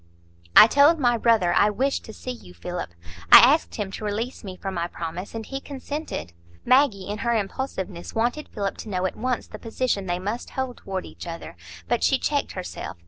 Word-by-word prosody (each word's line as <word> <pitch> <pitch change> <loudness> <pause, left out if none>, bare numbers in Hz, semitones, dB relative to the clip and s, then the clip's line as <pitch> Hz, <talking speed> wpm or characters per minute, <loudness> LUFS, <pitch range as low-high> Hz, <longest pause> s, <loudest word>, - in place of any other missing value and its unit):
"I - - +12
told 285 +8 +5
my 245 -5 +3
brother 225 -7 +3
I 205 - +4
wished 270 +6 -1
to 220 - -9
see 255 - -6
you, 90 - -11
Philip; 175 - -5 0.4
I - - +14
asked 280 +7 +5
him 205 -3 -3
to 215 - -7
release 220 +5 -3
me 190 -3 -7
from 195 0 -5
my 170 -1 -2
promise, 175 +4 -6
and 225 -1 -5
he 270 - -5
consented." 285 - -6 0.3
Maggie, 255 -8 +3
in 205 +1 -4
her 235 -2 +1
impulsiveness, 195 -4 -4
wanted 245 +7 -1
Philip 200 -1 -3
to 220 - -8
know 185 -2 -1
at 185 - -2
once 255 0 -2
the - - -10
position 225 -4 -2
they 175 0 0
must 205 +6 -4
hold 260 -2 -4
toward 190 -1 -5
each - - -10
other; 170 - -7 0.3
but - - 0
she - - +4
checked - - -1
herself. - - -6
215 Hz, 200 wpm, -24 LUFS, 185-255 Hz, 0.4 s, I